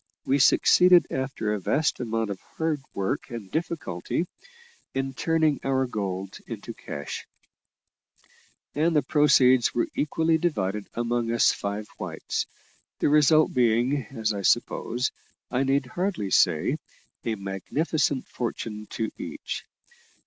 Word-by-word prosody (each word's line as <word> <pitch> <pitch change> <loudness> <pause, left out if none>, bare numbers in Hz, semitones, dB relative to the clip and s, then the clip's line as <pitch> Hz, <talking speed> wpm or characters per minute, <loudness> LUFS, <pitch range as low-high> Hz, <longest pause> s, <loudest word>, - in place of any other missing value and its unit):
We 140 +2 +2
succeeded, 180 +6 +6
after 130 -5 -2
a 105 - -1
vast 150 - +1
amount 115 -3 -1
of 95 - -6 0.2
hard 160 -3 0
work 95 -1 -2
and 115 -5 -7
difficulty, 160 - -2 0.7
in 135 0 -1
turning 160 +1 +1
our 130 -1 +1
gold 95 -5 -4
into - - -6
cash: 70 0 -6 1.5
and 160 +3 +1
the 150 - +4
proceeds 130 -4 +4
were 120 - +2
equally 160 +2 +1
divided 105 - -1
among 120 0 0
us 115 - +4
five 105 +1 -4
whites; - - -3 0.5
the - - +2
result 150 +1 +5
being, 125 +1 +2
as 110 -4 -2
I 100 - -3
suppose, 120 +5 +1 0.4
I 125 - +1
need 135 0 +2
hardly 175 - -2
say, 85 -4 +3 0.4
a 115 - -1
magnificent 130 - -1
fortune 110 -3 -4
to 110 -1 -3
each. - - -5
125 Hz, 125 wpm, -26 LUFS, 105-150 Hz, 1.5 s, succeeded